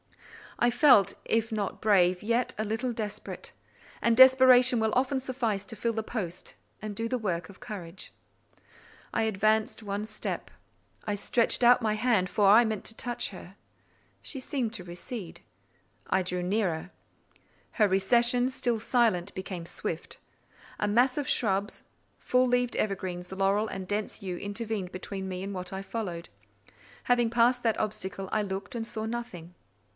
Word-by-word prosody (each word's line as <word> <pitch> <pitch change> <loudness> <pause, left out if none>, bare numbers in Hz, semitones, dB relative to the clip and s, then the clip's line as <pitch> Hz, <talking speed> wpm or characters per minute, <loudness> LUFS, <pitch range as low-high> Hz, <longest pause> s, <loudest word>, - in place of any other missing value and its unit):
I 240 - +3
felt, 240 - +5
if 225 0 +1
not 210 -3 -3
brave, 185 -4 +3
yet 235 +3 0
a 215 - -1
little 225 +4 -2
desperate; 215 -2 -6 0.5
and 230 0 +3
desperation 260 -1 +7
will 220 -1 +1
often 265 +2 +1
suffice 235 -6 -2
to 215 - -8
fill 230 +1 -1
the 220 0 -2
post 185 -6 -5 0.3
and 210 -1 -5
do 225 +2 -2
the 255 - 0
work 185 -5 -2
of 200 - -14
courage. 190 -5 -8 1.0
I 225 - +1
advanced 220 +1 +1
one 205 0 -3
step. 215 0 -5 0.5
I 210 - -1
stretched 235 +4 +1
out 245 +1 +6
my 215 -2 +1
hand, 215 -4 +1
for 205 +2 +2
I 215 +4 +8
meant 220 -3 -2
to 225 - -2
touch 240 -1 -2
her. 185 -1 -11 0.7
She 275 - -5
seemed 255 -4 -2
to 200 -5 -5
recede. 175 +2 -8 0.7
I 190 - +2
drew 180 0 -3
nearer: 185 -3 -1 0.8
her 215 -3 +4
recession, 235 +6 +3
still 240 -3 -1
silent, 215 -6 +1
became 185 -2 -6
swift. - - -5 0.6
A 210 - +1
mass 245 +6 +3
of 290 -3 -2
shrubs, 200 -2 0 0.4
full 255 0 +2
leaved 245 -1 +1
evergreens, 185 -3 -3
laurel 195 +3 +1
and 190 -3 -6
dense 205 +2 -3
yew, 185 -3 -4
intervened 205 -2 -4
between 190 +1 -6
me 185 0 -4
and 200 +1 -5
what 180 0 -6
I 190 - -4
followed. 195 -5 -5 0.7
Having 240 -2 +2
passed 245 +1 +3
that 225 -2 +1
obstacle, 195 -2 -4
I 215 - +1
looked 195 +3 -5
and 225 -1 -3
saw 220 -1 -5
nothing. 220 -8 -6
215 Hz, 160 wpm, -28 LUFS, 190-235 Hz, 1.0 s, I